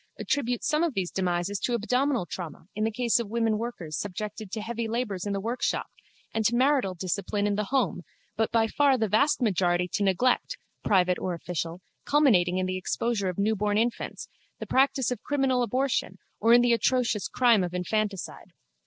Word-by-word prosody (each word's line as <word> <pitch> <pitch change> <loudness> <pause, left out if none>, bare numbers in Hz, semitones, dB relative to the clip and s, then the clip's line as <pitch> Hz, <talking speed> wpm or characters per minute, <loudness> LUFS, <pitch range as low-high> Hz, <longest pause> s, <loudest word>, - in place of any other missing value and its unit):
attributes 245 -4 -1
some 300 +1 +2
of 325 -7 -1
these 185 -2 -1
demises 185 +1 -1
to 240 - 0
abdominal 250 0 0
trauma 170 -3 -7
in 215 0 -2
the - - +1
case 240 +1 +1
of 230 -4 -4
women 225 -1 0
workers 195 -10 -5
subjected 210 +2 -5
to 220 - -3
heavy 230 +1 -3
labours 220 -5 -2
in 200 - -1
the 195 - -1
workshop 230 +5 -2 0.4
and 220 - 0
to 235 +3 +2
marital 255 -7 +2
discipline 195 +3 -2
in 205 - +1
the 210 +1 -1
home 255 -6 0 0.3
but 225 0 0
by 230 -1 +3
far 275 +3 +3
the 220 -2 0
vast 255 +7 +2
majority 180 -4 +1
to 205 - -3
neglect, 200 +6 +1 0.3
private 180 -3 +2
or 180 -2 -2
official, 170 +1 -4 0.2
culminating 200 -12 +3
in 185 - 0
the 185 0 -2
exposure 200 +1 -1
of 180 - -5
newborn 205 0 +1
infants, 235 +2 -2 0.3
the - - -6
practice 265 -1 +2
of 245 - -3
criminal 270 -3 +1
abortion 255 +3 0 0.2
or 230 - +3
in 240 +1 +8
the 240 -1 +4
atrocious 235 -3 +1
crime 235 -6 +3
of 175 - -3
infanticide. 195 +2 -3
215 Hz, 185 wpm, -27 LUFS, 190-245 Hz, 0.4 s, in